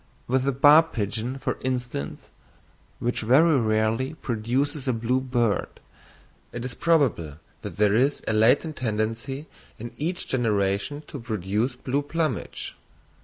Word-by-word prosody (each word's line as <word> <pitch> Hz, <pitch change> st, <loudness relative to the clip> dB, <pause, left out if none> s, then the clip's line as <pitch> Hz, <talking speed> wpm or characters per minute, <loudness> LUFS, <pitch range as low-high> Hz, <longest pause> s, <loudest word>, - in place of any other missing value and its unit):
With 130 Hz, +1 st, +1 dB
the 140 Hz, -, +2 dB
barb 150 Hz, +5 st, +6 dB
pigeon, 110 Hz, +5 st, -2 dB
for -, -, -3 dB
instance, 125 Hz, -, -4 dB, 0.7 s
which 120 Hz, +1 st, -2 dB
very 140 Hz, +6 st, +5 dB
rarely 110 Hz, +5 st, 0 dB
produces 130 Hz, +3 st, -2 dB
a 130 Hz, -, +2 dB
blue 120 Hz, +3 st, 0 dB
bird, 120 Hz, -5 st, -1 dB, 0.7 s
it 120 Hz, 0 st, -5 dB
is 125 Hz, -, -5 dB
probable 130 Hz, -, +1 dB, 0.2 s
that -, -, -7 dB
there 105 Hz, -1 st, +4 dB
is 135 Hz, +5 st, +2 dB
a -, -, +1 dB
latent 130 Hz, +8 st, +3 dB
tendency 115 Hz, +5 st, -2 dB, 0.3 s
in 120 Hz, +2 st, -8 dB
each 175 Hz, +5 st, -3 dB
generation 105 Hz, +3 st, 0 dB
to 145 Hz, -, -8 dB
produce 110 Hz, +2 st, -2 dB
blue 135 Hz, +3 st, -1 dB
plumage. 155 Hz, -3 st, -3 dB
125 Hz, 130 wpm, -25 LUFS, 110-140 Hz, 0.7 s, barb